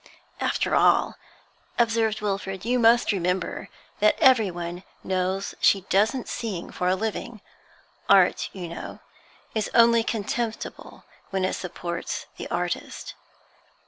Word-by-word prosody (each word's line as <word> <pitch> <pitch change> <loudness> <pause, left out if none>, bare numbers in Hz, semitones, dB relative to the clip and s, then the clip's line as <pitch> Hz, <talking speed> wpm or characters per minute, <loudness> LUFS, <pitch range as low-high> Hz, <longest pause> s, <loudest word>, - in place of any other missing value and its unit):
'After - - 0
all,' - - +4 0.6
observed 225 -2 +1
Wilfrid, 195 -1 -3
'you 250 +1 +2
must 235 0 +5
remember 180 -2 -2 0.3
that 210 +1 +4
everyone 185 - +2 0.2
knows 190 +1 -1
she 195 - +4
doesn't 220 +6 +2
sing 205 -7 -4
for 180 - -2
a 185 - +3
living. 220 +3 -4 0.7
Art, - - +4
you 180 -3 -6
know, 170 - -8 0.5
is 220 -2 -1
only 235 0 +6
contemptible 225 +1 -4 0.3
when 190 -1 0
it - - -1
supports 175 -1 -5
the - - -6
artist.' 175 0 -3
200 Hz, 115 wpm, -25 LUFS, 180-230 Hz, 0.7 s, only